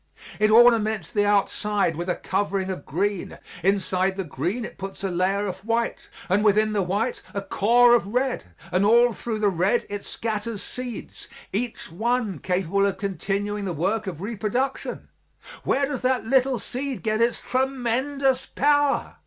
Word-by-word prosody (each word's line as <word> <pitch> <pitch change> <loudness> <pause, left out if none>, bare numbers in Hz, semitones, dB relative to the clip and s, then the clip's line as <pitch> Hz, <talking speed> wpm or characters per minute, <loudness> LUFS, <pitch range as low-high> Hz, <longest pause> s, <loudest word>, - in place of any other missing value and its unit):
It 215 0 +4
ornaments 220 -4 +5
the 205 -3 +2
outside 205 -3 +1
with 175 +3 -4
a 180 - +1
covering 195 -1 -1
of 180 -7 -7
green; 195 +5 -2 0.2
inside 190 0 +1
the 195 - -1
green 180 - -3
it - - -10
puts 195 0 -7
a 195 - -1
layer 190 +3 +1
of 190 -1 -4
white, 230 +1 -1 0.2
and 195 +3 +2
within 215 +1 +3
the 205 - +1
white 205 +7 -1
a 200 - -1
core 240 +5 +4
of 235 -4 +3
red, 250 +4 -1 0.3
and 185 +2 +2
all 235 +3 +5
through 225 +1 -4
the 210 -1 +2
red 190 +6 +1
it 205 0 -4
scatters 220 -1 -3
seeds, 250 -3 -7 0.3
each 225 -3 -3
one 220 - -1
capable 190 +2 +1
of 195 - -2
continuing 200 +2 -2
the 180 - -2
work 195 +7 -1
of 175 -1 -5
reproduction. 235 +5 -2 0.6
Where 280 +1 +2
does 275 -2 -4
that 255 -2 +1
little 260 +1 +3
seed 260 +4 -5
get 215 0 0
its 235 +1 +2
tremendous 265 +1 0
power? 290 0 +1
210 Hz, 160 wpm, -24 LUFS, 195-240 Hz, 0.6 s, ornaments